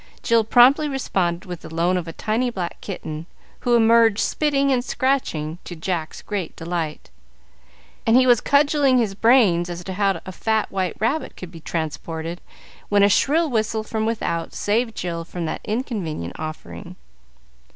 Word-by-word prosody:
Jill 230 -1 +3
promptly 255 +7 +5
responded 185 -10 -1
with 175 -2 -7
the - - -10
loan 170 +3 +1
of 175 -2 -2
a - - -4
tiny 225 +8 -1
black 185 -7 -5
kitten, 160 -4 -6 0.3
who 240 -1 +2
emerged 230 -2 +5
spitting 280 +1 +1
and 250 -2 +2
scratching, 175 - -1
to 175 - -8
Jack's 165 -1 -4
great 195 -6 -4
delight; 165 -2 -4 1.0
and 225 +2 +6
he 255 - +5
was 245 -3 +5
cudgelling 285 -2 +3
his 225 -5 +1
brains 200 -6 +4
as 175 0 -6
to 190 - -5
how 195 0 +1
a 185 - -6
fat 220 +3 -1
white 190 -2 -1
rabbit 245 +9 -1
could 180 -2 -8
be 165 - -10
transported, 160 +1 -4 0.5
when 205 -1 +4
a 200 - +6
shrill 315 - +3
whistle 220 -3 -1
from 220 0 -2
without 170 -7 -2
saved 225 +2 0
Jill 170 -2 -3
from 170 0 -5
that - - -4
inconvenient 200 - -3
offering. 155 0 -7
205 Hz, 160 wpm, -22 LUFS, 170-240 Hz, 1.0 s, and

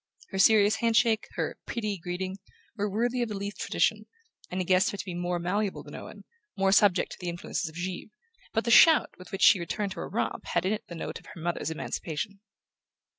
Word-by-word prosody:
Her 190 - -4
serious 215 +1 +5
handshake, 230 -1 +2
her - - -3
"pretty" 210 -4 -3
greeting, 185 +3 -4 0.4
were 205 -1 -1
worthy 240 +5 0
of 240 - -1
the 210 - -4
Leath 200 +1 -5
tradition, - - 0 0.4
and 180 - -3
he 185 - -1
guessed 185 +4 +4
her 205 - -5
to - - -5
be 185 - -5
more 175 0 -1
malleable 190 +4 -1
than - - -12
Owen, - - -9 0.3
more 195 0 +3
subject 200 -2 +4
to - - -8
the 180 - -3
influences 170 -1 -3
of 160 - -15
Givre; 180 +3 -5 0.4
but 225 - 0
the 235 - 0
shout 320 +6 +7
with 185 - -12
which 195 - -2
she 190 - +7
returned 195 +4 -3
to - - -7
her - - -5
romp - - -2
had - - 0
in 195 - +2
it 215 - -5
the 170 - -8
note 165 - -5
of - - -19
her - - -11
mother's 170 0 -2
emancipation. 165 +4 -4
195 Hz, 220 wpm, -28 LUFS, 180-215 Hz, 0.4 s, shout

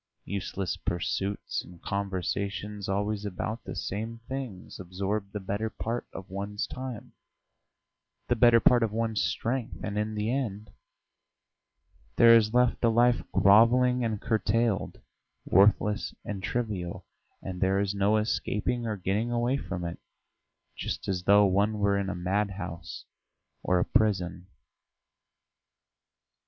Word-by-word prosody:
Useless 95 -1 -3
pursuits 95 +3 -2
and 90 -1 -14
conversations 100 +1 -3
always 100 +1 -1
about 105 +3 -4
the - - -6
same 110 +4 -4
things 130 -9 -6
absorb 100 +3 -3
the 105 - -4
better 100 +3 -2
part 115 +2 -4
of 95 - -8
one's 100 +2 -4
time, 130 -4 -7 1.1
the 120 - +2
better 120 0 +6
part 120 +1 +5
of 115 -2 +1
one's 110 -1 -1
strength, 120 0 -2
and 105 0 -2
in 110 +1 -2
the 105 +2 -1
end 110 -6 -3 1.4
there 115 0 +8
is 110 -2 +4
left 125 +1 +2
a 115 - +5
life 120 +1 +4
grovelling 120 +5 +5
and 110 -3 -1
curtailed, 110 0 0 0.5
worthless 105 +2 +3
and 100 -2 -4
trivial, 95 -4 -3 0.4
and 90 -2 -6
there 95 +1 +3
is 100 -1 0
no 100 +2 +2
escaping 115 +2 -1
or 110 -2 -2
getting 100 +5 -1
away 120 +2 +1
from 90 -10 -4
it 85 - -5 0.8
just - - -4
as 90 -2 -2
though 100 +1 +6
one 100 +3 +2
were 100 -1 +2
in 95 -1 -2
a 95 - -3
madhouse 90 -2 -3 0.6
or 90 - +2
a 90 - +2
prison. 95 -6 0
105 Hz, 130 wpm, -28 LUFS, 95-115 Hz, 1.4 s, there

